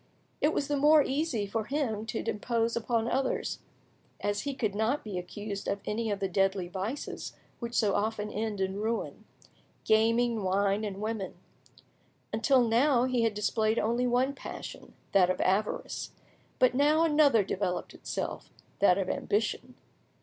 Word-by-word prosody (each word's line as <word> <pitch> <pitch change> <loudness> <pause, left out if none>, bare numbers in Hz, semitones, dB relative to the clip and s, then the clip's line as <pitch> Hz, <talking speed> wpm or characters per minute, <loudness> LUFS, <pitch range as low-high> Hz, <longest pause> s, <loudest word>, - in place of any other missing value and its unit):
It 300 - +4
was 285 - -1
the 290 - 0
more 295 +1 +6
easy 270 -7 -1
for 215 +2 -2
him 230 -6 -2
to 220 0 -4
impose 230 +2 0
on 230 0 0
others, 260 +2 -1 0.6
as 205 0 -1
he 280 -1 -3
could 215 -6 -1
not 220 +8 0
be 200 -4 -4
accused 200 +2 -6
of 200 - -1
any 220 +1 -1
of 200 -1 -1
the 195 - 0
deadly 195 -1 +1
vices 195 +9 -5 0.3
which 235 -1 -5
so 210 -3 +3
often 210 0 -1
end 215 -1 -3
in 190 0 -1
ruin—gaming, 225 +1 -1
wine, 200 +2 +1
and 200 -2 -4
women. 215 -3 -3 1.0
Until 245 +2 +3
now 245 +2 +4
he 255 -2 +1
had 225 -2 +1
displayed 215 +1 +1
only 235 +3 +1
one 250 +3 +2
passion, - - -9 0.2
that 185 -2 +5
of 185 - 0
avarice, 200 +3 -1 0.4
but 255 -1 +4
now 295 +4 +4
another 295 -8 +4
developed 185 -1 -2
itself, - - -5 0.3
that 190 -2 +5
of 195 -2 -1
ambition. 210 +4 -1
220 Hz, 150 wpm, -29 LUFS, 205-250 Hz, 1.0 s, more